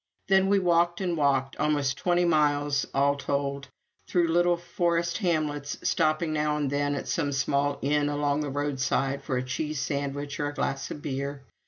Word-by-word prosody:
Then 190 0 +5
we 200 +1 +4
walked 175 -2 +2
and 180 -3 -1
walked 135 -3 +1
almost 145 -3 +1
twenty 175 +4 +2
five 175 - +2
miles 145 -2 +2
all 140 +1 +2
told 140 -1 -2 0.4
through 175 -2 +2
little 175 +1 +3
forest 170 0 -1
hamlets, 150 -6 -1
stopping 155 +1 +1
now 150 0 0
and 145 -2 -1
then 145 0 0
at - - -5
some 145 -4 0
small 140 +1 0
inn 145 +1 +2
along 145 0 0
the 150 -1 -2
roadside 135 -1 -1
for 130 -4 -1
a 125 - -1
cheese 150 +4 -3
sandwich 145 0 -3
or 145 - 0
a 145 - -4
glass 135 0 -2
of 150 - -7
beer. 140 0 -4
145 Hz, 180 wpm, -27 LUFS, 140-165 Hz, 0.4 s, Then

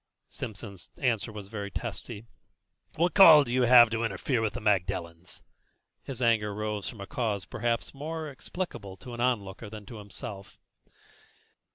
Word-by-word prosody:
Simpson's 100 -3 -7
answer 120 -4 0
was 105 -2 -8
very 100 -1 -5
testy. 100 +2 -6 0.7
"What 175 +3 +2
call 165 -7 +10
have 120 - -8
you 125 +1 +2
to 120 -2 +7
interfere 115 +4 -1
with 110 -2 -1
the 125 - -4
Magdalens?" 90 -5 -2 0.6
His 130 -2 -5
anger 105 -3 +2
rose 105 -1 -3
from 110 -5 -10
a - - -5
cause 110 -6 -2
perhaps 115 0 -2
more 155 +3 -5
explicable 130 - -6
to 125 -2 -10
an 120 - -5
onlooker 115 -4 -1
than 105 -1 -9
to 115 - -9
himself. 100 -1 -9
110 Hz, 150 wpm, -28 LUFS, 100-125 Hz, 0.7 s, call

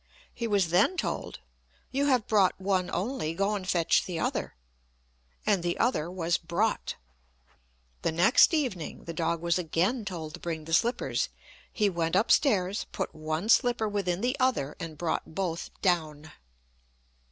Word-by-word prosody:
He 235 - -3
was 200 -5 +2
then 195 - +3
told, - - -3 0.5
"You 280 +2 +1
have 255 -6 +3
brought 200 -4 +3
one 190 -1 0
only, 180 - -2
go 200 +3 +1
and 190 -2 -4
fetch 170 -3 +3
the 175 -3 -3
other;" - - -2 0.9
and 200 -4 +2
the 175 0 -1
other 200 -10 +1
was 175 -2 0
brought. 175 +6 -1 1.1
The - - 0
next 180 - +5
evening 255 - -2
the 165 - -6
dog 165 0 -1
was 170 +1 +2
again 180 +8 0
told 165 -6 -6
to - - -8
bring 160 -2 -4
the 165 - -5
slippers. 235 +8 +1 0.4
He 210 - +1
went 170 -3 -1
up 200 +4 +3
stairs, 200 -8 +2
put - - -3
one 155 +5 -3
slipper 240 -2 +3
within 195 -3 -1
the 250 +3 +1
other, 250 - +1
and 160 -2 -6
brought 160 -1 -3
both 170 -3 -2
down. 160 -4 0
180 Hz, 155 wpm, -28 LUFS, 165-215 Hz, 1.1 s, next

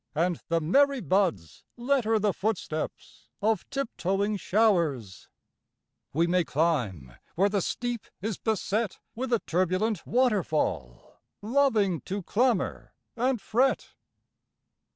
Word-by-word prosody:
And 170 +2 0
the 165 0 +1
merry 275 - +3
buds 180 - 0
letter 240 -3 +2
the 210 -2 +1
foot 215 0 0
steps 155 -7 -6
of 215 -2 0
tip 275 -2 -2
toeing 200 +3 0
showers; 170 - +1 0.8
We 165 +4 +2
may 180 +1 +2
climb 125 - -1 0.2
where 195 +4 +3
the 200 -1 0
steep 240 +3 -3
is 210 +1 -3
beset 215 -1 -1 0.2
With 255 +2 -4
a 235 - +2
turbulent 185 +4 0
waterfall, 170 - 0 0.2
loving 215 - +2
to 195 0 -4
clamor 235 +1 0 0.2
and 250 +1 +1
fret! 250 +6 +1
200 Hz, 115 wpm, -27 LUFS, 165-230 Hz, 0.8 s, merry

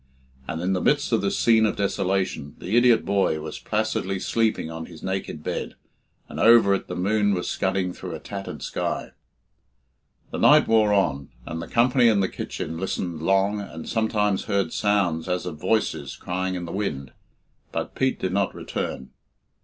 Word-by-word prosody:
And 80 - -3
in 95 +1 +1
the 90 - 0
midst - - +2
of - - +3
this - - 0
scene 115 -1 +4
of - - -2
desolation 95 -6 -1
the 95 +5 -3
idiot 120 -2 +5
boy 100 -5 +1
was 75 0 -6
placidly 105 -3 -1
sleeping 110 -6 0
on 80 0 -6
his 85 -3 -13
naked 95 -5 -4
bed, - - -4 0.5
and - - -7
over 115 -4 +6
it 100 - -2
the 90 - -5
moon 100 +2 +2
was 90 - -3
scudding 95 -1 -1
through - - -7
a - - -7
tattered 100 -1 -7
sky. - - -3 1.2
The - - -4
night - - +6
wore 110 -2 +4
on, 80 -9 +1 0.2
and 80 +1 -5
the - - -7
company 125 +1 +4
in 110 -3 +4
the 95 - +2
kitchen 80 +1 -5
listened 90 -3 -3
long, 95 +4 +2
and 80 -5 -8
sometimes 105 -3 0
heard 100 -4 0
sounds 95 -5 +1
as 90 0 -1
of 80 -4 -6
voices 110 +4 0
crying 95 +1 -3
in 90 -1 -4
the 85 - -7
wind, 70 -10 -3 0.6
but - - -3
Pete 130 0 0
did 95 -1 -2
not 100 0 0
return. 65 - -5
95 Hz, 175 wpm, -24 LUFS, 85-105 Hz, 1.2 s, over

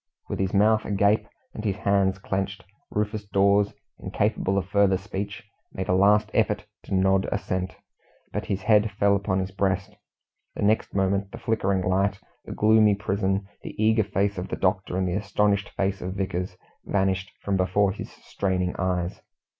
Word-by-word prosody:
With - - -3
his 95 -1 0
mouth 110 +2 +4
agape 100 +1 +2 0.3
and 105 - -6
his 100 -4 0
hands 100 -2 +1
clenched, 95 0 -3 0.3
Rufus 105 0 -2
Dawes, 100 +1 +3 0.2
incapable 95 +1 0
of 95 - 0
further 100 -1 +3
speech, 100 +3 -6 0.3
made 95 - -4
a - - +2
last 100 +3 +4
effort - - +1 0.2
to - - -2
nod 95 +1 +2
assent, 95 -2 -2 0.6
but - - -2
his 100 +1 -2
head 105 0 +4
fell 100 0 +3
upon 100 -1 0
his 95 0 -2
breast; 95 0 -1 0.6
the - - -3
next 105 0 +1
moment, 100 0 +1
the - - -7
flickering 100 -4 0
light, 95 +2 +1 0.3
the - - -8
gloomy 110 -1 +4
prison, 100 -1 -1
the - - -8
eager 110 0 +4
face 100 0 -1
of 90 - -4
the - - -3
doctor, 95 -1 0
and 95 -1 0
the 90 - -1
astonished 105 +1 +1
face 95 0 -2
of 95 +1 -4
Vickers, 90 -1 -3 0.3
vanished 95 0 0
from 100 - 0
before 95 +2 +2
his 100 - -7
straining 90 -2 -2
eyes. 90 -1 -1
100 Hz, 170 wpm, -25 LUFS, 95-100 Hz, 0.6 s, mouth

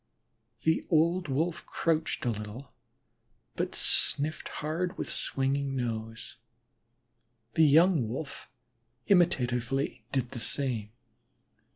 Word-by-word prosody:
The 160 +1 +2
old 170 +2 +3
Wolf 160 +5 -1
crouched 160 -2 0
a 120 - +2
little 110 +4 -7 0.8
but - - -2
sniffed 150 +2 +1
hard 165 +4 -3
with - - -4
swinging 135 0 -1
nose; 115 -3 -4 1.2
the 160 - +5
young 155 -3 +5
Wolf 140 +5 -6 0.6
imitatively 135 - +2
did 125 -3 -1
the 120 - -5
same. 115 -4 -2
140 Hz, 95 wpm, -30 LUFS, 120-160 Hz, 1.2 s, the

